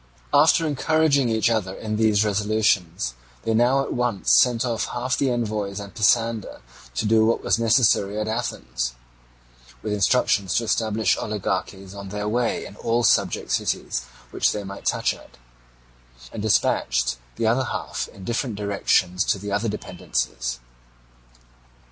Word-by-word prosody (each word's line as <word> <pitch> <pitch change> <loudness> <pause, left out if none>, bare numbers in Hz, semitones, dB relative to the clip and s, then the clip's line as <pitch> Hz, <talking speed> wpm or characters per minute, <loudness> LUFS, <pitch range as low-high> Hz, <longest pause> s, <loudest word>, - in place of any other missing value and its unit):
After 155 +3 +5
encouraging 150 -2 +2
each 110 +1 +2
other 105 -5 0
in 110 -1 -4
these 110 -1 +3
resolutions, 100 - 0 0.3
they 115 - 0
now 125 +4 +3
at - - -4
once 120 -5 +1
sent 125 0 +2
off 115 -3 -1
half 125 +2 -2
the 135 - +1
envoys 105 -4 -2
and 100 -1 -9
Pisander 115 0 +1 0.3
to - - -1
do 110 +1 +4
what 115 +1 +1
was - - +1
necessary 110 -3 +3
at 110 - -2
Athens 65 - -3 0.9
(with 105 - -2
instructions 100 -3 +2
to 120 - +2
establish 110 -4 +1
oligarchies 95 -2 -3
on 100 -1 -8
their 105 +1 -4
way 120 +2 0
in 100 - -11
all 120 +1 0
the - - +6
subject - - +1
cities 60 - -1 0.3
which - - +1
they 105 - -4
might 100 0 -9
touch - - +1
at), - - -16 1.0
and - - -5
dispatched 60 - +1 0.2
the 115 - -1
other 120 +4 +2
half - - -4
in 95 - -14
different 120 +2 -2
directions 100 -2 +1
to 110 - +1
the 100 +1 -6
other 105 +3 0
dependencies. - - -3
110 Hz, 150 wpm, -23 LUFS, 100-120 Hz, 1.0 s, the